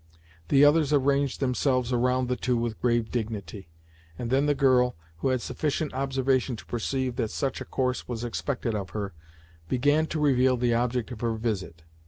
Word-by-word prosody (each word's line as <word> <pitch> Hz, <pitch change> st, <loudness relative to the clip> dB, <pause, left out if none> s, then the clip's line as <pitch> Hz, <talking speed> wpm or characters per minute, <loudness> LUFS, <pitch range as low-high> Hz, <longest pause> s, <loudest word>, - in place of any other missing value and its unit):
The 140 Hz, +1 st, +6 dB
others 150 Hz, 0 st, +4 dB
arranged 140 Hz, -1 st, +2 dB
themselves 130 Hz, -1 st, +1 dB
around 125 Hz, +1 st, +1 dB
the 125 Hz, -, 0 dB
two 125 Hz, -1 st, 0 dB
with 115 Hz, -2 st, -3 dB
grave 120 Hz, -2 st, +1 dB
dignity, 105 Hz, -6 st, -4 dB, 0.5 s
and 120 Hz, -1 st, -4 dB
then 135 Hz, +2 st, +3 dB
the 145 Hz, -, +2 dB
girl, 130 Hz, -2 st, +3 dB, 0.2 s
who 85 Hz, -, -1 dB
had 130 Hz, -2 st, 0 dB
sufficient 150 Hz, 0 st, -2 dB
observation 130 Hz, -1 st, 0 dB
to -, -, -11 dB
perceive 130 Hz, +1 st, -2 dB
that 110 Hz, -, 0 dB
such 135 Hz, +2 st, -2 dB
a -, -, -5 dB
course 125 Hz, -1 st, -2 dB
was 120 Hz, -2 st, -4 dB
expected 120 Hz, 0 st, -2 dB
of 100 Hz, -4 st, -3 dB
her, 100 Hz, -2 st, -3 dB, 0.6 s
began 145 Hz, +5 st, +2 dB
to 155 Hz, -, -3 dB
reveal 130 Hz, -3 st, +3 dB
the 120 Hz, 0 st, +1 dB
object 120 Hz, 0 st, 0 dB
of 115 Hz, -, -7 dB
her 115 Hz, -1 st, 0 dB
visit. 95 Hz, -8 st, -3 dB
125 Hz, 180 wpm, -27 LUFS, 115-135 Hz, 0.6 s, The